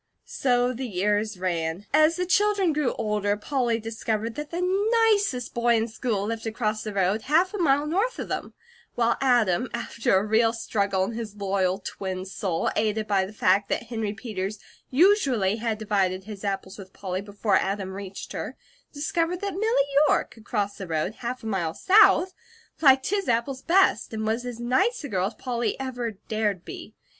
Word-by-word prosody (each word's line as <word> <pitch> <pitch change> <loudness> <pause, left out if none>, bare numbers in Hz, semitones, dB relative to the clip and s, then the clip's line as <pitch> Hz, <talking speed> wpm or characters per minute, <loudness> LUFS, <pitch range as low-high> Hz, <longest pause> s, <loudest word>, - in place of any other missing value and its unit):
So 245 -1 +1
the 255 +1 -4
years 210 +1 0
ran. 170 0 -2
As 310 +2 +5
the 360 - -1
children 395 -2 +2
grew 295 -4 0
older, 210 -2 -1
Polly 240 0 0
discovered 225 0 -3
that 295 +3 -6
the 350 +1 -2 0.5
nicest 395 - 0
boy 235 0 +3
in 225 0 +1
school 220 -2 -2
lived 225 +1 -4
across 215 -1 -1
the 215 - -4
road 195 +3 +1
half 325 - +2
a 415 - -4
mile 290 -3 +3
north 405 +11 0
of - - -4
them; - - -4 0.4
while 235 -1 +2
Adam, 245 -4 +2
after 230 -4 0
a 195 - 0
real 225 +1 +3
struggle 200 -4 0
in 195 - -2
his 225 -3 -6
loyal 190 -2 0
twin 190 -1 -5
soul, 190 -3 -2
aided 215 0 0
by 200 -3 +1
the - - -10
fact 200 -1 +2
that - - -1
Henry 225 -3 -3
Peters 210 -2 -4 0.3
usually 265 - +3
had 225 -1 -2
divided 195 -3 0
his 205 0 -9
apples 195 0 -4
with 190 -1 -11
Polly 185 -1 -4
before 205 0 0
Adam 195 -1 -2
reached 195 0 -7
her, - - -5 0.3
discovered 330 +4 -1
that 400 -1 -2
Milly 395 -7 +2 0.2
York, - - +1
across 210 -3 -3
the 190 - -6
road, 160 +4 -1
half 245 +1 -4
a - - -9
mile 175 -7 -1
south, 380 -3 +5 0.5
liked 265 -1 +5
his 400 -6 0
apples 245 +3 0
best, 375 +3 +3
and 220 0 -3
was 230 +3 -1
as 240 -1 -6
nice 260 - +1
a 285 - -5
girl 185 -2 0
as 220 - -8
Polly 240 -1 -2
ever 245 -3 -3 0.2
dared 210 -4 -1
to - - -39
be. - - -9
225 Hz, 185 wpm, -25 LUFS, 200-265 Hz, 0.5 s, As